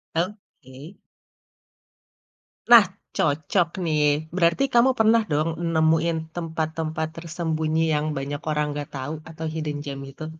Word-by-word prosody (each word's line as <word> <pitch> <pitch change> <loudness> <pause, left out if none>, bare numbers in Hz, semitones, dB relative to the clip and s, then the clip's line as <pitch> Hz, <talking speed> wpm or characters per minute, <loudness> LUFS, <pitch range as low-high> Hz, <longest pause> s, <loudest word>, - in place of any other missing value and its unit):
Oke. 170 - -6 1.7
Nah, 230 -3 +10 0.3
cocok 155 +4 +1 0.2
nih. 150 -1 +1
Berarti 170 +8 +3
kamu 240 +2 +6
pernah 225 +1 +5
dong, 155 +2 +1 0.3
nemuin 160 +1 +3 0.2
tempat-tempat 160 -1 -3
tersembunyi 160 -1 -1
yang 150 0 0
banyak 140 +1 -4
orang 150 0 +1
nggak 145 -1 -5
tahu 135 +3 -4 0.2
atau 160 0 -6
hidden 155 -2 -3
gem 140 -1 -5
itu? 155 - -8
160 Hz, 115 wpm, -24 LUFS, 150-170 Hz, 1.7 s, Nah